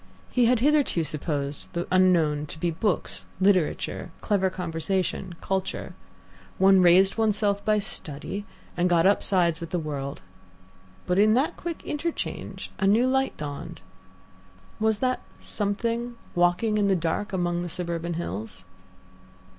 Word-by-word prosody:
He 250 -2 +3
had 240 -1 +3
hitherto 285 - +3
supposed 145 -2 -4
the 175 0 -2
unknown 165 -5 +3
to 160 - -8
be 170 +1 0
books, 185 +4 -1
literature, 190 -4 +1
clever 195 -3 +1
conversation, 180 +1 -2
culture. 190 -1 -3 0.6
One 190 0 +6
raised 185 +4 +5
oneself 205 -2 +1
by 215 0 +3
study, 195 0 -4 0.3
and 180 +1 +2
got 170 -1 +4
upsides 180 -4 +3
with 165 - -5
the 180 - -1
world. 140 - -4 0.8
But 180 +2 +1
in 215 +2 +5
that 270 +5 +1
quick 340 -1 -6
interchange 315 +3 -4
a 195 - +2
new 220 +5 +4
light 265 +1 +1
dawned. 145 -2 -6 1.0
Was 220 -1 +2
that 255 0 0 0.2
something" 230 +3 -2 0.2
walking 175 +5 +2
in 205 - +3
the 195 - +3
dark 175 +5 -1
among 175 -2 0
the 175 - -4
surburban 170 0 -3
hills? 100 - -4
185 Hz, 135 wpm, -26 LUFS, 165-210 Hz, 1.0 s, One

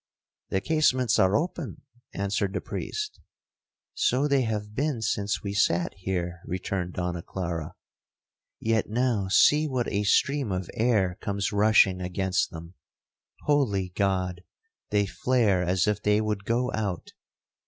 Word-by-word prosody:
'The 95 - 0
casements 130 -7 +2
are 95 +2 +4
open,' 170 -2 -3 0.3
answered 100 0 -1
the - - -1
priest. 425 0 -5 0.7
'So 145 - +2
they 140 -2 +3
have 105 -3 -3
been 140 +1 -1
since 105 -2 -1
we 100 -1 -3
sat 85 -3 +1
here,' 90 -2 -3
returned 90 0 -3
Donna 90 -1 -3
Clara; 85 -2 -5 0.8
'yet 110 -2 0
now 115 -3 +1
see 150 +10 +5
what 130 -4 -1
a 100 0 0
stream 135 +3 +2
of 90 -1 -3
air 105 -6 +1
comes 100 -1 -2
rushing 100 -3 +4
against 95 +1 0
them! 85 0 -10 0.7
Holy 110 -11 +1
God! 90 -2 -1 0.5
they 105 -1 +2
flare 105 -3 +1
as 90 +1 +1
if 105 -1 0
they 105 0 +3
would 105 -2 -2
go 120 +3 0
out!' 100 -5 -3
100 Hz, 135 wpm, -27 LUFS, 95-120 Hz, 0.8 s, see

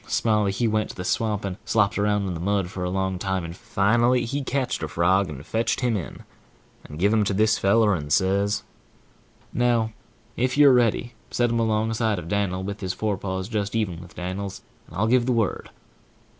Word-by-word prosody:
Smiley 105 -3 +1
he 115 +4 0
went 110 0 0
to - - -8
the 90 - -5
swamp 105 -1 0
and 95 -1 -4
slopped 100 -3 +2
around 105 -1 +1
in 95 - -2
the 85 - -5
mud 95 0 0
for 90 - -5
a 90 - -1
long 95 0 -1
time, 95 -2 -2
and 85 +1 -7
finally 120 +7 +2
he 140 +5 -2
ketched 135 -1 -1
a 80 - -2
frog, 90 +5 +2
and 70 -1 -8
fetched 115 +2 -1
him 120 -3 +1
in, 85 -11 -6 0.6
and 75 - -10
give 100 +5 +2
him 110 -1 +3
to 100 -1 -1
this 110 0 +3
feller, 105 +1 +4
and 75 -5 -4
says: 100 +5 +2 0.9
"Now, 120 -2 +1 0.4
if 130 +3 0
you're 145 -2 +7
ready, 120 0 +2 0.2
set 120 -1 +1
him 115 - +1
alongside 110 -1 +1
of 85 -2 -6
Dan'l, 95 -2 -1
with 100 +1 -5
his 95 -1 -2
fore 105 -2 -1
paws 95 0 -3
just 105 -2 -2
even 95 -7 -1
with 90 -1 -14
Dan'l 95 +3 -4 0.4
and - - -13
I'll 105 - +2
give 120 +2 +3
the 125 - +2
word." 115 -4 -1
100 Hz, 205 wpm, -24 LUFS, 95-115 Hz, 0.9 s, you're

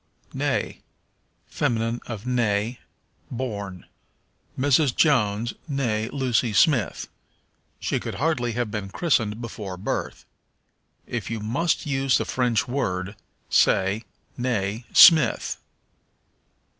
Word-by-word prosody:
Née. - - -2 0.6
Feminine 115 0 -1
of 110 -4 -6
né, 115 -2 0 0.5
born. 100 -7 -5 0.7
"Mrs. 140 0 +3
Jones, 115 -6 +2 0.2
née 115 -5 -1
Lucy 125 -4 0
Smith." 130 - +2 0.7
She - - -1
could - - -6
hardly 130 -6 0
have 120 -2 -2
been 105 -2 -4
christened 110 - 0
before 105 -5 -6
her - - -8
birth. 95 - -4 0.8
If - - -4
you 115 -1 -3
must 135 +11 -1
use 135 -2 +2
the - - -2
French 125 -3 0
word 100 -7 -2 0.3
say, 100 +4 +2 0.3
née 115 -2 -1
Smith. 155 -8 +6
115 Hz, 105 wpm, -24 LUFS, 105-130 Hz, 0.8 s, Smith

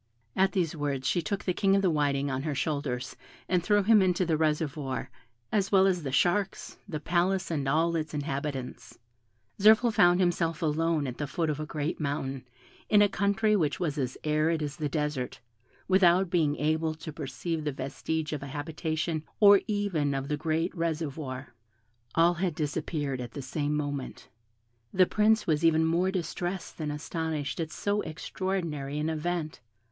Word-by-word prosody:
At 190 0 +3
these 170 -4 0
words 140 -3 -2
she 175 - +2
took 200 +5 -3
the 180 - +1
King 195 +2 +3
of 195 - +2
the 185 - +3
Whiting 140 -2 +1
on 130 0 -2
her 150 0 -2
shoulders, 140 -5 -2 0.3
and 180 -1 +2
threw 205 +2 +3
him 215 0 +6
into 185 0 +2
the 165 -2 +1
reservoir, 150 -4 -1 0.4
as 200 -2 +1
well 190 -1 +6
as 185 -2 +2
the 140 -3 -4
sharks, 175 +9 0
the 155 -5 -3
palace, 175 +3 0
and 145 -4 -1
all 165 +3 +2
its 155 -1 -2
inhabitants. 140 -3 -4 0.6
Zirphil 220 +3 +6
found 180 -5 +5
himself 170 -2 +1
alone 160 0 +1
at 125 -2 -5
the 145 - -2
foot 160 +3 -1
of 150 - -4
a 155 - -4
great 150 0 -3
mountain, 135 -3 -3 0.4
in 205 -1 +6
a - - +5
country 200 +2 +1
which 155 -7 0
was 160 -5 -1
as 130 -2 -2
arid 155 +1 +1
as 150 +1 -5
a 150 - 0
desert, 150 -3 -2 0.5
without 185 -1 +4
being 155 -5 +2
able 155 +1 0
to 155 0 -8
perceive 155 +3 -4
the 150 - -1
vestige 140 +4 -3
of 145 - -3
a 140 - -6
habitation, 155 +2 -3 0.2
or 200 -2 +8
even 190 -9 0
of 135 +1 -3
the 150 - +1
great 160 +3 -1
reservoir. 150 -6 -3 0.6
All 170 +1 +5
had 175 -2 -1
disappeared 150 -3 -2
at 120 -2 -7
the 140 - -6
same 145 +2 -2
moment. 145 -2 -4 0.6
The 185 -1 +5
Prince 215 +3 +3
was 155 -1 +1
even 160 -1 +4
more 170 +3 +2
distressed 180 0 -4
than 155 -2 -2
astonished 150 -1 -3
at 160 -2 -2
so 205 +3 -1
extraordinary 160 -5 -3
an 150 +1 -1
event. 160 0 -2
160 Hz, 175 wpm, -28 LUFS, 145-180 Hz, 0.6 s, or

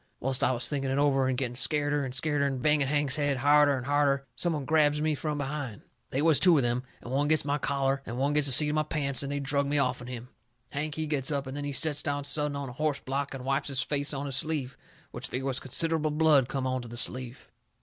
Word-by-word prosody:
Whilst 130 0 -1
I - - +3
was 125 -1 0
thinking 135 -2 -2
it 135 - 0
over, 135 -2 +2
and 130 -1 -1
getting 125 -2 -2
scareder 145 +2 +1
and 130 - -4
scareder, 140 +2 0
and 135 -2 -3
banging 150 +1 +2
Hank's 145 -1 +1
head 145 -2 0
harder 145 +1 +4
and 125 - -6
harder, 140 -1 +1
some 175 -1 0
one 145 -3 -3
grabs 150 -1 +3
me 155 0 +1
from 150 +1 -3
behind. 140 -6 -5 0.3
They 135 +3 -1
was 160 -3 +5
two 180 -3 +6
of 135 - +2
them, 120 +1 0 0.2
and 120 - -9
one 140 +2 +1
gets 155 -2 +2
my 145 +1 0
collar 135 0 0
and 120 -1 -6
one 140 +3 +1
gets 150 -1 +3
the - - +4
seat 150 +4 +6
of - - -1
my 155 - +2
pants, 145 -3 -1
and 140 0 -4
they 145 - -2
drug 140 0 0
me 145 +1 0
off'n 125 -3 -1
him. 125 -1 -7 0.4
Hank, 150 +1 -3
he 160 - -2
gets 145 -4 -1
up, 140 -1 -1
and 130 +1 -7
then 145 0 -4
he 145 - -3
sets 150 +1 +1
down 145 -1 -2
sudden 145 0 0
on 140 -1 -4
a - - -7
horse 150 +1 -1
block 135 +1 -3
and 130 -1 -8
wipes 135 +1 -1
his 135 -3 -1
face 145 +1 -1
on 140 0 -4
his 135 -2 +4
sleeve, 145 -4 -1 0.4
which - - -5
they 130 - -4
was 135 -2 -1
considerable 160 +3 -1
blood 150 -4 +3
come 135 -1 -2
onto 130 -2 -2
the 120 +1 -9
sleeve. 125 +1 -3
140 Hz, 265 wpm, -28 LUFS, 130-150 Hz, 0.4 s, two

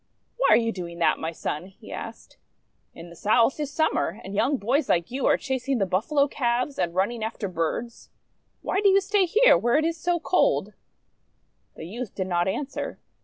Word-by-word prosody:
"Why - - +2
are - - +7
you 230 -1 0
doing 170 -4 -7
that, 170 - +2
my 160 - -3
Son?" 160 +1 -4
he 190 - -14
asked. - - -8 0.3
" - - -44
In 170 +1 -11
the - - -12
South 230 - +2
is 295 -2 -2
Summer, 290 - 0
and 195 - -8
young 265 +8 +1
boys 255 +8 0
like 170 +3 +1
you 265 +2 -1
are - - +4
chasing 265 0 -2
the 200 - +1
Buffalo 240 - +1
calves 250 +1 -1
and 170 0 -1
running 215 +5 0
after 220 -2 -3
birds. 185 +7 -4 0.5
Why 385 - 0
do 405 - +5
you 390 +1 +5
stay 395 -1 +1
here 465 +8 +5
where 240 +4 +2
it 310 - +1
is 330 0 -1
so 345 +1 0
cold? 370 +9 +1 0.5
' - - -45
The - - -7
youth 225 +5 -7
did 190 - -2
not 175 -1 0
answer. 270 +8 -3
235 Hz, 205 wpm, -25 LUFS, 185-295 Hz, 0.5 s, are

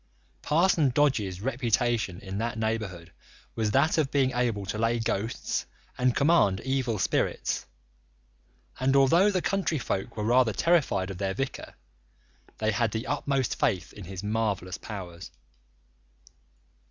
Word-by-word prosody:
Parson 160 -2 +3
Dodge's 120 -9 +1
reputation 120 -6 0
in 95 0 -5
that 115 0 -2
neighbourhood 110 -7 -3 0.4
was 110 -2 0
that 140 +8 +3
of 145 -4 +1
being 135 -3 +2
able 120 -5 -1
to 105 +3 -4
lay 115 +1 +2
ghosts 110 0 -2 0.3
and 125 -1 +1
command 140 - +3
evil 130 -4 -1
spirits, - - -1 1.1
and 135 +1 +2
although 165 +9 +5
the 185 -3 0
country 195 -5 0
folk 100 -7 -3
were 105 - -2
rather 120 0 +3
terrified 135 - +2
of 95 - -8
their 95 -1 -1
vicar, 135 0 -4 0.8
they 110 0 +1
had 115 +1 +1
the 110 +4 -4
utmost 135 -3 -1
faith 90 -5 0
in 100 - -10
his 95 +1 -7
marvellous 105 -4 -1
powers. 90 -5 -8
115 Hz, 135 wpm, -27 LUFS, 100-135 Hz, 1.1 s, although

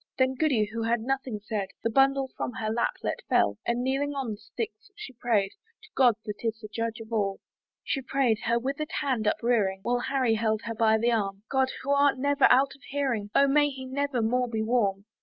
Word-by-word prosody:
Then 260 0 +3
Goody, 260 -6 +2
who 230 - -3
had 230 0 +1
nothing 260 -2 -2
said, 210 -3 -2 0.2
Her 230 - +1
bundle 270 +1 +3
from 245 - -3
her 220 -4 -3
lap 235 +1 0
let - - -2
fall; - - +2
And 235 +1 0
kneeling 280 +2 -1
on 265 -5 -2
the 210 - -5
sticks, 215 - -7
she 415 -11 -9
pray'd 220 -5 +1 0.3
To 435 - -16
God 250 -4 +5
that 210 - -5
is 225 -1 -1
the 215 -2 -9
judge 230 0 -2
of 225 0 -9
all. 200 -3 0 0.4
She 270 - -1
pray'd, 255 -4 +1
her 235 0 +2
wither'd 275 +6 -3
hand 250 -6 0
uprearing, 210 -5 +1
While 245 +2 +1
Harry 255 -2 +1
held 220 0 0
her 230 - -4
by 220 0 +3
the 235 +2 +2
arm 200 -3 -1
"God! 265 -1 +2
who 280 - -1
art 280 -1 +4
never 285 +2 +3
out 270 +2 +5
of 280 - -19
hearing, 260 -7 -1
"O 280 - +6
may 290 +1 +4
he 265 -2 -7
never 265 -2 -1
more 250 +3 +1
be 220 -1 -1
warm!" 205 -4 +1
240 Hz, 215 wpm, -27 LUFS, 220-270 Hz, 0.4 s, O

